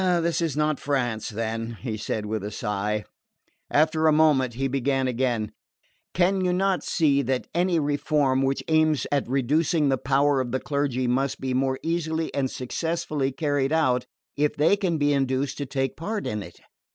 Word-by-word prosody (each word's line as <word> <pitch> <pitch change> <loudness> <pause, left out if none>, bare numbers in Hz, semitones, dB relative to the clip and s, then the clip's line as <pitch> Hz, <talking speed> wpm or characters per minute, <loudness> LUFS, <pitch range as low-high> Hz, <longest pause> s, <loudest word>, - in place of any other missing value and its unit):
"This 170 -2 +1
is 160 -4 -1
not 150 -2 +1
France, 125 -6 -1
then," 115 +1 -4
he 115 -4 -4
said 110 0 -3
with 105 -1 -3
a 105 - -3
sigh. 105 0 -2 0.6
After 155 +1 +3
a - - +6
moment 145 -6 +3
he 135 +2 0
began 135 0 0
again: 120 -3 -1 0.6
"Can 185 +2 +2
you 180 - +2
not 190 +1 +1
see 145 -4 +2
that 130 -1 -1
any 175 0 +2
reform 145 -2 +1
which 135 0 0
aims 155 -2 +2
at 140 -4 0
reducing 145 +4 +2
the 135 -1 +1
power 140 +1 +2
of 125 -2 -4
the 130 - 0
clergy 140 -3 -1
must 130 +2 0
be 130 -1 -2
more 130 +1 +1
easily 165 -1 -1
and 135 -2 0
successfully 155 +1 -2
carried 145 -1 0
out 130 -6 +2 0.3
if 150 0 +1
they 155 +7 +4
can 185 -5 -1
be 145 -1 +2
induced 135 0 0
to 140 - -3
take 135 -1 -2
part 205 +6 -4
in 105 -1 -2
it? 85 -3 -11
140 Hz, 175 wpm, -25 LUFS, 130-155 Hz, 0.6 s, a